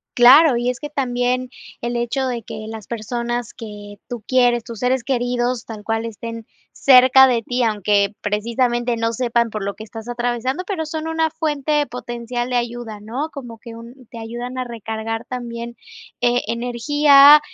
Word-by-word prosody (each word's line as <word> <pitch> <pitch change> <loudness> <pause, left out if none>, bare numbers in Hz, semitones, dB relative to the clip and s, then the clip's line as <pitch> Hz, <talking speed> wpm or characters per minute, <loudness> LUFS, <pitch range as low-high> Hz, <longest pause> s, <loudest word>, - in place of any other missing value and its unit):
Claro, 260 +3 +7
y 240 +1 0
es 250 - -9
que 295 - -6
también 250 -2 -1 0.3
el 240 +1 -3
hecho 240 +3 -1
de 245 -2 -3
que 215 0 -8
las 220 -2 -8
personas 235 +1 -3
que 205 -3 -10
tú 240 -3 -6
quieres, 245 -2 +3
tus 230 -3 -9
seres 250 0 +1
queridos, 245 -1 -1
tal 215 -2 -8
cual, 225 +1 -1
estén 230 0 -7 0.2
cerca 260 0 +7
de 235 -3 +1
ti, 245 +2 -2
aunque 205 -2 +1
precisamente, 235 +3 0
no 230 0 -1
sepan 235 -1 0
por 215 -1 -4
lo 200 0 -3
que 220 - -9
estás 225 +1 -9
atravesando, 245 +6 -2
pero, 350 -5 -3
son 315 0 -4
una 320 0 +1
fuente 300 -2 0
potencial 240 0 -5
de 250 - -1
ayuda, 240 -3 -3
¿no?, 245 +9 -4
como 245 -5 -9
que 230 -1 -10
un 235 +2 -13
te 235 - -10
ayudan 240 +3 -6
a 255 - -1
recargar 225 -1 -5
también, 235 -1 -6 0.5
e 245 0 +2
energía, 280 +5 +6
240 Hz, 170 wpm, -20 LUFS, 230-255 Hz, 0.5 s, Claro